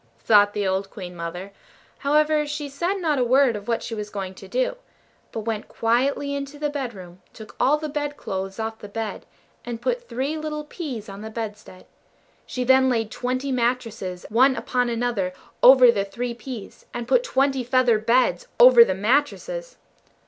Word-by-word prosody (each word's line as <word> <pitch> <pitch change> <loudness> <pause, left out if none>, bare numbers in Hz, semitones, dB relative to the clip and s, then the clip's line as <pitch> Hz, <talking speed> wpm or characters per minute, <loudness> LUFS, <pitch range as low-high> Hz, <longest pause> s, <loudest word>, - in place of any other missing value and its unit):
thought 205 -1 +4
the 205 -1 -1
old 190 +1 -1
Queen 180 -3 -9
mother; 175 +3 -6 0.5
however, 300 +1 +2
she 295 0 -4
said 340 +8 -2
not 320 -7 0
a - - +3
word 255 0 +4
of 205 0 -7
what 230 -1 -1
she - - -5
was 210 -1 -5
going 195 -2 -5
to - - -12
do; - - 0 0.6
but 225 - -4
went 220 -1 -3
quietly 265 +5 0
into 280 +1 -5
the 295 0 -2
bedroom, 195 -11 -6
took 220 -1 -12
all 295 +3 +4
the 310 0 -4
bed 290 0 -3
clothes 190 0 -5
off 220 0 -4
the 205 - -9
bed, 225 +1 -5 0.4
and 235 -1 -5
put 485 - -2
three 270 +6 -2
little 305 -1 -4
peas 285 - -6
on 195 0 -9
the 220 - -6
bedstead. 210 -4 -7 0.6
She 250 - -3
then 260 +1 +5
laid 225 -3 0
twenty 255 +2 -2
mattresses 235 -7 -2
one 260 +5 +4
upon 250 -2 -1
another 230 -6 -1 0.3
over 255 -1 +8
the 200 -4 -1
three 235 +5 -4
peas, 240 -3 -9
and 240 -1 -4
put - - +4
twenty 270 - +1
feather 245 -2 +3
beds 230 -5 +2
over 245 -1 +9
the 190 -5 -1
mattresses. 290 - -1
245 Hz, 180 wpm, -23 LUFS, 210-280 Hz, 0.6 s, over